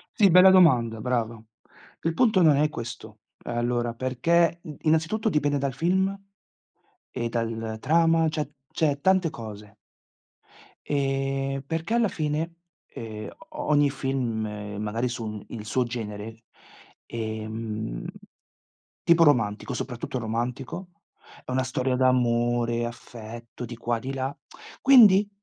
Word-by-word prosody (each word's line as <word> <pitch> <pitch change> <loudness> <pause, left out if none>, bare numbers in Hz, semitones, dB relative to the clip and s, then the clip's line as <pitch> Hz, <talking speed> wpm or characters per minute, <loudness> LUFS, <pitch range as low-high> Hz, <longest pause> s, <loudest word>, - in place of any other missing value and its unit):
Sì, 200 -2 +5
bella 180 +2 +8
domanda, 125 -12 +5
brava. 115 -2 -2 0.6
Il 165 - 0
punto 215 -1 +3
non 155 -4 +6
è 150 +1 +3
questo, 115 -4 -8 0.2
ehm 120 - -4
allora, 120 0 0
perché 165 +8 +1
in 155 -5 -8
innanzitutto 165 +8 +1
dipende 145 -4 +1
dal 135 -1 -1
film 185 +8 +1 1.0
e 120 - -3
dalla 115 -1 -3
trama, 165 +4 +3
cioè- 150 -2 -3 0.2
cioè 145 -3 +1
tante 190 0 +3
cose. 105 -3 -10 1.1
Ehm, 135 -1 -1
perché 165 +6 -3
alla 235 -1 +3
fine, 155 0 -2 0.3
ehm 110 -2 -7 0.2
o 300 - -5
ogni 145 -1 +4
film, 135 -4 -2 0.4
magari 110 +4 -1
sul 110 -3 -5
il 110 -2 -7
suo 125 +4 +1
genere, 115 -1 -6 0.6
ehm 110 - -5 1.0
tipo 170 0 +5
romantico, 120 -5 +2
soprattutto 125 +1 -4
romantico, 125 - -4 0.6
è - - -6
una 130 +1 +1
storia 130 0 -1
d'amore, 120 -2 +2
affetto, 120 0 -8
di 120 +1 -8
qua 120 0 -1
e - - -6
di 130 +4 -5
là. 135 +1 -3 0.5
Quindi 210 -7 +7
130 Hz, 125 wpm, -26 LUFS, 115-160 Hz, 1.1 s, bella